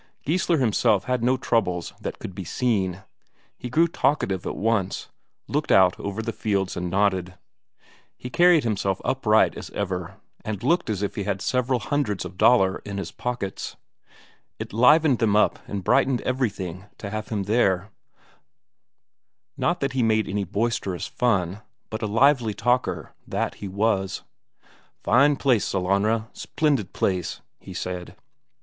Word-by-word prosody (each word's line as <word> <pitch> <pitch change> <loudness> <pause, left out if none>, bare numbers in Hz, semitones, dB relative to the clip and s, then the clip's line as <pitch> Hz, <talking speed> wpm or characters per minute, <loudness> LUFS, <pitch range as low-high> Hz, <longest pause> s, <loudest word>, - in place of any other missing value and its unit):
Geissler 170 +2 +1
himself 110 -4 +2
had 125 -2 -1
no 130 +2 +3
troubles 90 -9 0
that - - -5
could 95 - -7
be 95 +1 -6
seen; 95 -2 -1 0.5
he 125 - -7
grew 165 +7 +3
talkative 135 - 0
at - - -3
once, 105 -3 -1 0.4
looked - - -1
out 95 -1 +5
over 100 +2 -4
the 115 0 -3
fields 100 -3 -1
and 90 0 -3
nodded. 95 -1 0 0.8
He 125 - -8
carried 175 -1 +5
himself 100 -4 -1
upright - - +3
as - - -8
ever, 90 -4 -3 0.3
and 105 -1 -4
looked 165 0 +2
as 105 -2 -1
if 100 - -2
he 100 - -4
had 100 -2 -1
several 125 +4 0
hundreds 110 - -1
of 90 +1 -8
Daler 95 -2 +4
in 100 -1 -6
his 90 -4 -4
pockets. 120 -6 -4 0.8
It - - -7
livened 135 +3 +5
them 110 -3 +2
up 105 - +3
and 100 -2 -4
brightened 130 +6 +2
everything 95 -8 -2
to 100 - -7
have 110 0 -4
him 105 -3 -2
there; 100 -2 +1 1.6
not 175 +1 0
that 135 -1 -1
he 130 - +1
made 110 -1 +2
any 100 0 -2
boisterous 100 -2 -2
fun, 100 -5 0 0.3
but 110 - -4
a 110 - -1
lively 115 0 +3
talker, 125 +3 0
that - - -2
he 100 - -4
was. 100 -1 0 0.8
"Fine 140 +5 +4
place, 125 -7 +2
Sellanraa, 100 +4 0
splendid 140 - -1
place," 90 -2 -1 0.2
he - - -11
said. 90 -1 -5
105 Hz, 150 wpm, -24 LUFS, 95-125 Hz, 1.6 s, out